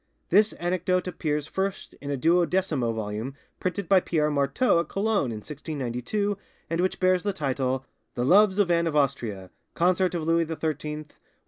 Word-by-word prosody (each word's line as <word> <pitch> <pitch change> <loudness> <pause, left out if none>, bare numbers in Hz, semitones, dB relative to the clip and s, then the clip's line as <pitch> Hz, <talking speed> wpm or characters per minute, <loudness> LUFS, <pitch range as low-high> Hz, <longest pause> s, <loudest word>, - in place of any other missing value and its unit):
This 210 +4 +4
anecdote 180 +1 0
appears 150 -4 -2
first 190 +4 -3
in 140 - -6
a 140 - -1
duodecimo 170 -5 +2
volume 110 +4 -4 0.2
printed 185 0 -2
by 190 +1 +6
Pierre 150 -4 0
Marteau 140 - +2
at 170 - -2
Cologne 200 - +1
in 110 -1 -6
1692, 150 - -3 0.3
and 165 +1 +1
which 185 - 0
bears 185 -1 +3
the 205 +1 -1
title, 130 -4 -1 0.3
'The 120 - 0
Loves 195 +5 +5
of 200 -4 +3
Anne 170 0 +2
of 155 - -2
Austria, 120 -10 -1 0.2
Consort 180 +1 +2
of 165 - -2
Louis 165 0 +3
XIII, 160 - -3 0.2
with - - -14
M. 150 0 -4
165 Hz, 175 wpm, -26 LUFS, 140-185 Hz, 0.3 s, by